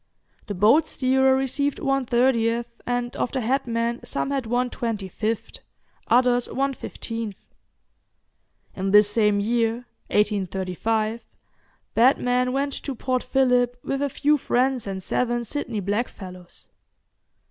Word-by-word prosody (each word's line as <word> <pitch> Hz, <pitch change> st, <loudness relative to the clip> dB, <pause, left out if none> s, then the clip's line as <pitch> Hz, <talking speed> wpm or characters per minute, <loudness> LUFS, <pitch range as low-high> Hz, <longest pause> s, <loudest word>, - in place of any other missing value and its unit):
The 205 Hz, -, -4 dB
boat 225 Hz, -, +4 dB
steerer 265 Hz, 0 st, +3 dB
received 270 Hz, +2 st, 0 dB
one 275 Hz, -2 st, 0 dB
thirtieth, 235 Hz, -1 st, +2 dB, 0.2 s
and 245 Hz, 0 st, -2 dB
of -, -, -1 dB
the 260 Hz, -, -1 dB
headmen 235 Hz, -1 st, -1 dB
some 275 Hz, -, -2 dB
had 270 Hz, -4 st, -2 dB
one 245 Hz, +1 st, 0 dB
twenty 220 Hz, -5 st, -3 dB
fifth, 215 Hz, +4 st, -3 dB, 0.5 s
others 245 Hz, 0 st, +3 dB
one 275 Hz, +1 st, 0 dB
fifteenth. 225 Hz, -5 st, -6 dB, 1.4 s
In 195 Hz, 0 st, -2 dB
this 205 Hz, +1 st, +6 dB
same 210 Hz, -2 st, +3 dB
year, 230 Hz, +2 st, 0 dB, 0.2 s
1835, 210 Hz, +2 st, 0 dB, 0.7 s
Batman 250 Hz, +1 st, +3 dB
went 280 Hz, +1 st, -1 dB
to 275 Hz, -, -5 dB
Port 255 Hz, +1 st, -1 dB
Phillip 250 Hz, -2 st, +2 dB
with 275 Hz, 0 st, -2 dB
a 285 Hz, -, 0 dB
few 295 Hz, +3 st, +2 dB
friends 255 Hz, -2 st, 0 dB
and 190 Hz, -1 st, -4 dB
seven 240 Hz, +2 st, 0 dB
Sydney 235 Hz, -3 st, -4 dB
blackfellows. 190 Hz, -4 st, -5 dB
240 Hz, 125 wpm, -24 LUFS, 215-260 Hz, 1.4 s, this